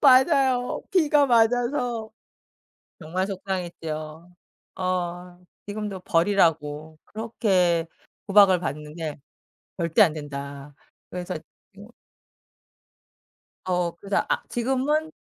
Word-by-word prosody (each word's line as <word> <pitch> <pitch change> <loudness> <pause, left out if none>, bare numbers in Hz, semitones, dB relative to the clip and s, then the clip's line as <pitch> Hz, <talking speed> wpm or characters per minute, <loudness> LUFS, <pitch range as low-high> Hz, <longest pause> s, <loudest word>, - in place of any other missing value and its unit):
맞아요. 265 -2 +4
비가 295 -5 +4
맞아서 240 -1 +2 0.9
정말 180 +4 -2
속상했죠. 170 -4 -5 0.5
어 180 -1 -3 0.3
지금도 205 -2 -5
버리라고 160 -4 +1
그렇게 190 -7 +1 0.4
구박을 195 -3 +6
받는데 150 0 -5 0.6
"절대 165 -3 +2
안 165 -6 +6
된다." 140 -1 -7 0.4
그래서 180 -1 -5 0.4
뭐 - - -12 1.8
어 180 -2 0
그래서 195 +3 -1
아 - - +1
지금은 270 +6 0
185 Hz, 190 characters per minute, -25 LUFS, 165-230 Hz, 1.8 s, 구박을